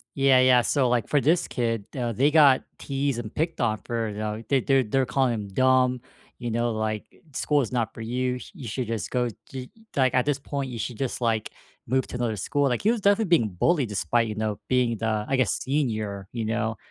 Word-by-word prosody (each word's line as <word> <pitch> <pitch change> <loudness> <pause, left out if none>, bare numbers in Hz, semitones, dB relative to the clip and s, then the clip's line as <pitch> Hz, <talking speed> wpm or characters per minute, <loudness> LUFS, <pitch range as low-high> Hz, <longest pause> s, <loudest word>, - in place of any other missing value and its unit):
Yeah, 135 -2 +5
yeah, 130 -1 +6
so, 130 0 +1
like, 120 -3 +1
for 145 - +2
this 160 +6 +2
kid, 115 -4 -2
uh, 120 -2 -1
they 135 +7 +3
got 145 -4 +6
teased 140 -2 -2
and 110 -3 -7
picked 165 +2 -2
on 110 -3 +1
for, 115 -2 -2
you 105 - -7
know, 110 +1 -3
they're 135 -3 +2
they're 135 0 +3
they're 130 +4 +1
calling 130 -3 +1
him 105 -3 -4
"dumb," 130 +3 +2 0.4
you 120 -2 -4
know, 120 +1 0
like, 110 -1 -2 0.2
"School 145 +1 +1
is 120 - -4
not 115 -3 -1
for 115 - -8
you, 125 +2 -1
you 125 - -8
should 125 +3 -3
just 115 -2 -3
go 125 -1 0 0.2
ye 130 -1 -7 0.2
like, 130 -2 +3
at 125 +1 +2
this 145 -2 +1
point, 140 -1 -4
you 120 - -6
should 110 +1 -4
just, 135 -2 -2
like, 115 -3 0 0.4
move 130 +1 +1
to - - -8
another 120 -3 -1
school." 140 +7 0
Like, 120 - -1
he 220 - +4
was 235 -3 -2
definitely 205 +2 +3
being 110 -8 +1
bullied 150 -9 +2
despite, 105 +4 +1
you 110 - -4
know, 110 -1 -2
being 125 -3 +2
the, 110 -1 -1
I 135 - +1
guess, 130 -4 +2
senior, 110 -8 -2
you 115 -2 -3
know? 110 0 -1
125 Hz, 225 wpm, -25 LUFS, 110-135 Hz, 0.4 s, yeah